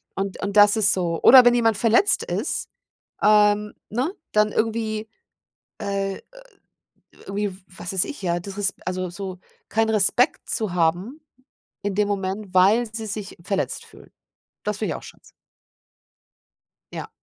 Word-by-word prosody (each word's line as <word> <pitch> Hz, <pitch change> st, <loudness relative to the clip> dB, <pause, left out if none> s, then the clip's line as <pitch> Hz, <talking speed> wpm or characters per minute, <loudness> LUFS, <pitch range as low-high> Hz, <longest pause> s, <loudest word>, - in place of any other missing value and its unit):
Und 195 Hz, 0 st, -4 dB
und 200 Hz, +1 st, -3 dB
das 205 Hz, +1 st, +7 dB
ist 205 Hz, -2 st, +5 dB
so 170 Hz, -3 st, -2 dB
oder 255 Hz, -1 st, +9 dB
wenn 240 Hz, -, +6 dB
jemand 225 Hz, -3 st, +2 dB
verletzt 230 Hz, -, +3 dB
ist, -, -, -2 dB, 0.6 s
ähm, 210 Hz, 0 st, +4 dB, 0.2 s
ne, 260 Hz, -, -2 dB, 0.2 s
dann 210 Hz, 0 st, +3 dB
irgendwie, 220 Hz, -1 st, -2 dB, 0.7 s
äh, 195 Hz, -1 st, -2 dB
äh -, -, -16 dB, 1.1 s
irgendwie, 200 Hz, 0 st, -2 dB
w 195 Hz, -, -20 dB
was 185 Hz, 0 st, -7 dB
weiß 190 Hz, -, +3 dB
ich, 290 Hz, -, -8 dB
ja, 175 Hz, -1 st, -1 dB
disres 200 Hz, +2 st, -2 dB
also, 185 Hz, -1 st, -3 dB
so 185 Hz, +1 st, -6 dB, 0.3 s
keinen 225 Hz, 0 st, +1 dB
Respekt 215 Hz, +4 st, +2 dB
zu 215 Hz, -7 st, -1 dB
haben 180 Hz, -, 0 dB, 0.6 s
in 200 Hz, -2 st, -2 dB
dem 210 Hz, 0 st, +1 dB
Moment, 195 Hz, 0 st, -4 dB
weil 205 Hz, +6 st, +4 dB
sie 220 Hz, -1 st, -4 dB
sich 205 Hz, -1 st, -6 dB
verletzt 195 Hz, 0 st, -2 dB
fühlen. -, -, -17 dB, 0.5 s
Das -, -, -2 dB
finde -, -, -2 dB
ich -, -, -4 dB
auch -, -, -12 dB
scheiße. -, -, -13 dB, 1.7 s
Ja. -, -, -6 dB
205 Hz, 150 wpm, -23 LUFS, 190-220 Hz, 1.7 s, oder